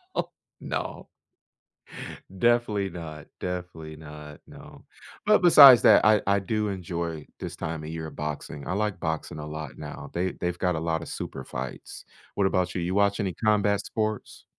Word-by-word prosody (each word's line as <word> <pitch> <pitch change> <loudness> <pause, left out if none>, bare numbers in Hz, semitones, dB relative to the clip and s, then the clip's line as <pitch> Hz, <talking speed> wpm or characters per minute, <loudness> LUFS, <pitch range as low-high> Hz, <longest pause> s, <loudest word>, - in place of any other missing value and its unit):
No, - - -1 0.3
no. - - -5 1.3
Definitely 120 -3 +2
not, 80 -4 -8
definitely 90 -3 -5
not 75 -1 -11
no, - - -14 0.4
but 210 -1 +5
besides 140 -8 +10
that, - - +7
I 105 -1 +5
I 100 0 +3
do 105 +2 -1
enjoy 85 -4 -4
this - - -6
time 80 0 -5
of 75 - -6
year, 80 0 -5
of - - -11
boxing 75 -1 -5
I 90 - -1
like 105 -2 -1
boxing 80 -1 -3
a 75 - -6
lot 75 -2 -7
now, 75 - -8
they 90 +2 0
they've 90 0 -2
got 90 -1 0
a - - -2
lotta 80 0 -2
super 65 - -6
fights. 65 0 -7 0.3
What 100 -1 +2
about 90 -2 0
you? 90 - -1
You 90 +2 -2
watch 100 +1 +2
any 95 -4 -1
combat 105 -1 +1
sports? 110 -2 -3
90 Hz, 170 wpm, -26 LUFS, 80-100 Hz, 1.3 s, besides